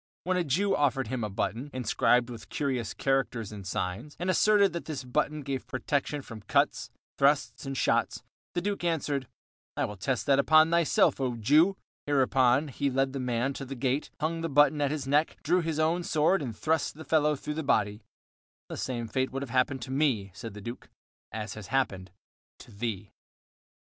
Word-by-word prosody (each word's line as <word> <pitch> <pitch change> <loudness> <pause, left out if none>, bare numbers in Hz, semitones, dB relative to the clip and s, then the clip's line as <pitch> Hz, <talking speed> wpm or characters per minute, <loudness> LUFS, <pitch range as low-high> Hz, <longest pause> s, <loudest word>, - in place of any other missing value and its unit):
When 185 +1 0
a 180 - +1
Jew 180 +7 +1
offered 135 -2 +1
him 130 -3 -2
a 105 - -2
button, 115 +7 -3
inscribed 125 0 +2
with 115 -2 -10
curious 130 -6 -2
characters 130 -5 0
and 100 -3 -8
signs, 95 +10 -3
and 180 +2 +1
asserted 200 -1 +4
that 170 - -5
this 155 -4 -5
button 150 +4 -1
gave 135 -1 -4
protection 140 +2 -2
from 110 -4 -9
cuts, - - +1 0.3
thrusts, 140 0 +2
and 135 -1 -3
shots, - - +1 0.3
the 175 - +1
Duke 200 -2 -2
answered: 145 -6 -1 0.5
"I - - +1
will 105 - -7
test 125 +6 -1
that 140 -1 +4
upon 155 +3 +5
thyself, 170 -4 +3
O 125 -2 0
Jew." 155 - +4 0.3
Hereupon 135 0 +3
he 140 +2 -1
led 135 0 0
the 135 - -3
man 125 +1 -1
to 135 - -6
the 135 +1 -6
gate, 130 +3 -1
hung 165 +2 -1
the 165 - -2
button 145 +1 +4
at 140 - +2
his 145 -2 -3
neck, 150 +3 +2
drew 180 0 +3
his 165 -2 -2
own 160 +3 +2
sword, 165 +2 +2
and 115 -6 -5
thrust 160 -2 0
the 160 +1 -10
fellow 150 -1 +3
through 150 +2 -5
the 160 - -3
body. 105 -7 +1 0.7
"The - - -5
same 120 -3 -3
fate 130 +4 -1
would 135 +1 -3
have 130 - -8
happened 130 0 +1
to 130 - -7
me," 130 -9 +1
said 115 +1 -8
the 105 - -8
Duke, 120 +4 -8 0.4
"as 110 -1 -5
has 105 -3 -9
happened 95 -8 -1 0.5
to - - -14
thee." 105 -2 -4
135 Hz, 195 wpm, -29 LUFS, 120-150 Hz, 0.7 s, upon